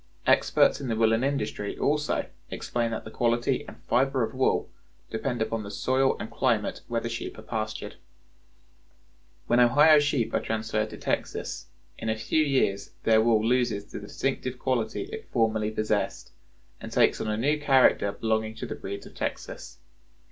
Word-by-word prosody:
Experts 140 - +4
in 135 - -4
the 115 - 0
woolen 115 +1 +3
industry, 110 -7 -2
also, 150 +1 0 0.2
explain 120 -1 -2
that 115 - -4
the 110 - -9
quality 120 +1 +1
and - - -10
fiber 135 0 +2
of 110 - -3
wool 130 0 +1 0.4
depend 120 +1 -1
upon 115 0 -3
the 100 - -7
soil 130 +5 +1
and 110 - -6
climate 115 -5 0
where 120 -1 0
the 115 - -3
sheep 115 0 -5
are 110 - -10
pastured. 110 -1 -4 1.5
When 120 +5 +3
Ohio 145 +6 +7
sheep 145 -5 0
are - - +3
transferred 110 -1 -2
to - - -9
Texas, - - -3 0.3
in 110 - -3
a 110 - +1
few 155 +7 +1
years 130 -9 0
their 110 -1 +5
wool 110 -1 +3
loses 120 -4 +1
the - - -5
distinctive 130 +4 -3
quality 125 -4 -1
it 440 +3 -9
formerly 110 -2 +1
possessed, 110 -1 -2 0.5
and 115 - -8
takes 115 0 +3
on - - -3
a 105 0 -1
new 145 +6 +1
character 130 -7 +4
belonging 110 0 -1
to - - -5
the - - -4
breeds 100 +1 -7
of - - -13
Texas. - - -5
115 Hz, 170 wpm, -27 LUFS, 110-130 Hz, 1.5 s, Ohio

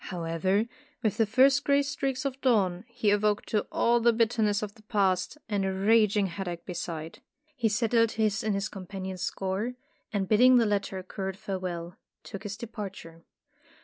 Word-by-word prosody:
However, 180 +4 0 0.4
with 215 -4 0
the 225 - +3
first 270 +5 +4
gray 280 0 +3
streaks 275 -2 -2
of 270 0 -3
dawn, 195 -7 +2
he 235 -4 0
awoke 205 0 +1
to 210 - -1
all 235 0 +3
the 235 +1 +4
bitterness 220 -2 +1
of 205 -1 -5
the 220 - -19
Past 195 +1 0
and 205 -3 0
a 190 - 0
raging 210 +1 +3
headache 175 -2 -5
beside. 165 -2 -5 0.4
He 235 -5 +1
settled 230 +1 +2
his 215 0 0
and 215 -2 0
his 200 +1 -1
companion's 190 -1 -7
score, 195 +6 -2 0.4
and 200 -2 -1
bidding 250 +5 +6
the 235 - +4
latter 200 -2 -1
a 185 - -6
curt 190 0 -5
farewell, 180 -2 -5 0.3
took 200 - -8
his 205 -2 -6
departure. 195 -7 -8
205 Hz, 170 wpm, -28 LUFS, 190-230 Hz, 0.4 s, bidding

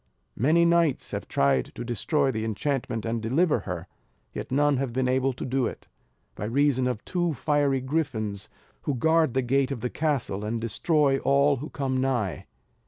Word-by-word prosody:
Many 160 +8 +3
knights 170 -4 +2
have - - -4
tried 70 -2 +2
to - - -5
destroy 135 - 0
the 110 -3 -3
enchantment, 115 0 -2
and 115 0 -2
deliver 140 +6 +2
her; 85 -2 -4 0.5
yet - - -6
none 145 +1 +3
have 130 -2 -2
been 130 0 0
able 130 +1 +2
to 125 - -6
do 130 -1 0
it, - - -8 0.5
by 105 - -5
reason 130 +2 +2
of 125 -4 -3
two 175 -3 -1
fiery 140 0 +1
griffins 110 -8 -2 0.3
who 145 - -2
guard 160 0 +2
the 130 - +2
gate 135 +2 +1
of 125 -5 -4
the 125 - -2
castle, 140 -10 -1
and 110 +2 -2
destroy 135 +5 +1
all 140 +1 +3
who 145 +5 -6
come 135 -2 -2
nigh. 120 - -1
130 Hz, 175 wpm, -26 LUFS, 115-145 Hz, 0.5 s, Many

